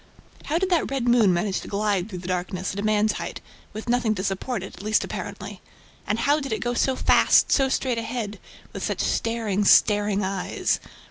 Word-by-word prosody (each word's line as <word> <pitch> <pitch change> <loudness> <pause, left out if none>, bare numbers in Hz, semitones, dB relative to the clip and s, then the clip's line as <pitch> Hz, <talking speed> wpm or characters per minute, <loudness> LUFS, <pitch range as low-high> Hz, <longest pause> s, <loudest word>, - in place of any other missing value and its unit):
How 315 - 0
did 375 +1 -1
that 345 - +2
red 265 -3 -2
moon 235 -5 +5
manage 185 +3 -1
to - - -10
glide 200 -1 -1
through 185 - -6
the - - -5
darkness, 185 +1 -3
at 200 - -5
a - - -3
man's 215 0 +2
height, - - -5 0.3
with 215 +2 -8
nothing 235 -2 +1
to 185 - -4
support 195 +2 -2
it, 190 - -9
at - - -10
least 215 +1 +1
apparently? - - -7 0.5
And 210 - 0
how 285 +6 +2
did 275 -2 -5
it 220 - -1
go 240 +3 -2
so 260 +2 +1
fast, - - +4
so 270 -1 +3
straight 255 -3 0
ahead, 225 -3 -4 0.3
with - - -6
such - - -1
staring, 225 -3 0
staring 205 0 +4
eyes? 190 -1 -1
215 Hz, 205 wpm, -24 LUFS, 195-245 Hz, 0.5 s, moon